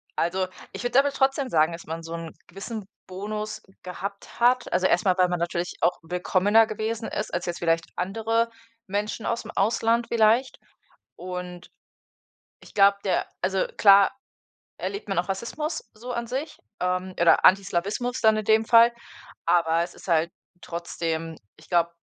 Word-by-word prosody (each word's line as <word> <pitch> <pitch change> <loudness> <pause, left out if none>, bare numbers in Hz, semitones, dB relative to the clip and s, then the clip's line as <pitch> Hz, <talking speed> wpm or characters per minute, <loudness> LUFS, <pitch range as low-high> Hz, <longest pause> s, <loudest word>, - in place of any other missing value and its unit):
also, 185 +2 0 0.3
ich - - -6
würde 245 +2 +3
aber 285 0 +2
trotzdem 270 -1 +1
sagen, 155 +1 +3
dass 165 0 -8
man 165 +1 -6
so 165 +1 -7
'n 165 -1 -6
gewissen 200 +3 -7 0.2
Bonus 210 +3 -5 0.2
gehabt 200 +4 -7
hat, 245 +1 +3
also 185 +1 +2
erst - - +2
mal, 185 -2 +4
weil 180 0 +4
man 175 -1 -1
natürlich 170 +1 -2
auch 175 - +2
willkommener 190 +5 +3
gewesen 220 +1 -3
ist - - -4
als 175 - -2
jetzt 175 -1 -4
vielleicht 165 0 +1
andere 225 +5 0 0.4
Menschen 205 +3 -3
ausm 235 0 -3
Ausland 230 +3 +1
vielleicht. 230 +3 +2 0.6
Und 180 -1 -7 0.9
ich - - -17
glaube, 200 0 +5
der 190 - 0
also, 190 +1 +1
klar 200 -1 +7 0.7
erlebt 405 - -5
man 195 - +1
auch 180 - -3
Rassismus 265 - -3
so 240 +3 -8
an 235 -1 -3
sich 270 +6 -4 0.2
ähm, 185 +1 -1
oder 170 -1 +5
Antislawismus 200 +6 +2
dann 220 -1 +5
in 215 - -3
dem 220 0 +4
Fall, 235 +1 +7 0.6
aber 170 -1 +3
es 175 - -6
ist - - -14
halt 165 0 +2 0.3
trotzdem, 165 -1 -4 0.2
ich - - -19
glaube 170 -1 +2
195 Hz, 160 wpm, -25 LUFS, 175-225 Hz, 0.9 s, klar